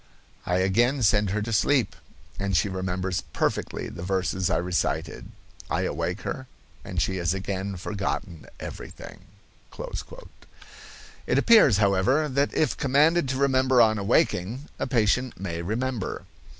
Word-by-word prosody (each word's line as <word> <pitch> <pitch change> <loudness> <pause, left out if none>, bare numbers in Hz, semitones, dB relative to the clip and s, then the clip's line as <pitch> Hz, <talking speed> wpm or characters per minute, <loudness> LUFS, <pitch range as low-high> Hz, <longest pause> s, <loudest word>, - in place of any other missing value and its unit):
I 90 - +1
again 115 +9 +2
send 105 -1 +3
her 105 +2 -1
to 115 +1 -3
sleep, 105 -2 +2 0.4
and 100 -2 0
she 100 - +1
remembers 95 0 -2
perfectly - - -1
the 85 - -8
verses 95 0 -1
I - - +2
recited. 90 0 -2 0.4
I - - 0
awake - - -2
her, - - -5 0.4
and - - -4
she 95 - 0
has 85 +1 0
again 95 0 -3
forgotten 95 -3 -4
everything." 95 -1 -9 2.0
It - - +2
appears, 215 - +6
however, 105 +9 +2
that 140 +2 +1
if 155 - +1
commanded 145 +3 +3
to 130 - -1
remember 130 -2 +3
on 110 -2 +5
awaking, 115 - 0
a - - -1
patient 125 -1 +1
may 85 -3 -4
remember. 115 +3 -3
100 Hz, 135 wpm, -26 LUFS, 95-130 Hz, 2.0 s, appears